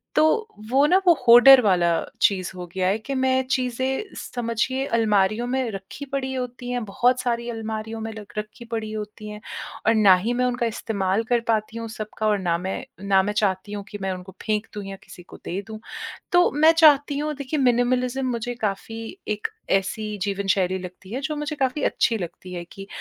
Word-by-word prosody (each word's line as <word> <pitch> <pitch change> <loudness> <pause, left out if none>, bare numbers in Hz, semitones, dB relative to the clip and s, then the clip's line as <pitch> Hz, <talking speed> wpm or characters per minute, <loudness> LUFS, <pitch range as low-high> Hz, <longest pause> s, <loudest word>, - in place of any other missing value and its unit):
तो - - +5 0.5
वो 270 +3 +4
ना, 360 +5 +5
वो 345 - +9
होडर 250 +3 +10
वाला 180 -6 +3 0.3
चीज़ 185 -2 +2
हो 180 -1 -6
गया 185 -1 0
है 195 +3 +2
कि 250 +6 -5
मैं 260 0 +2
चीज़ें 260 - -1
समझिए 245 +3 -2
अलमारियों 215 -2 +2
में 255 -1 0
रखी 195 +8 -8
पड़ी 265 -1 -3
होती 250 -1 -5
हैं, 245 -1 -1
बहुत 245 +5 +2
सारी 235 -1 -1
अलमारियों 220 -1 -4
में 225 0 -4
लग 210 -1 -11
रखी 215 +3 -6
पड़ी 225 -2 -4
होती 215 0 -6
हैं 210 0 -7 0.5
और 225 - +6
ना 205 -4 +7
ही 210 +7 -1
मैं 250 +1 +1
उनका 245 -1 0
इस्तेमाल 210 -2 -1
कर 240 - +4
पाती 220 0 0
हूँ 230 0 -4
सबका 215 0 -4
और 210 -1 +2
ना 175 -3 0
मैं 190 +7 -4 0.2
ना 195 -1 +5
मैं 205 +2 -2
चाहती 205 -1 0
हूँ 205 -1 -4
कि 205 - -6
मैं 190 0 -1
उनको 185 +1 -10
फेंक 215 0 0
दूँ 205 - -5
या 195 0 -6
किसी 175 - -13
को - - -13
दे 190 +3 -3
दूँ। 220 -1 -7 0.5
तो 355 0 +5
मैं 310 +2 +6
चाहती 290 -3 +5
हूँ, 300 +1 -1
देखिए, 280 +2 -3
मिनिमलिज़्म 250 +1 +2
मुझे 240 +1 -3
काफ़ी 225 - -4
एक 210 0 -1 0.2
ऐसी 210 +2 0
जीवन 200 -1 -2
शैली 190 -1 +1
लगती 185 +1 -10
है, 250 - -2
जो 305 +1 -2
मुझे 295 0 -3
काफ़ी 270 +1 -1
अच्छी 230 - +2
लगती 180 -1 -7
है 175 -1 -4
कि 195 0 -9
225 Hz, 200 wpm, -24 LUFS, 200-255 Hz, 0.5 s, होडर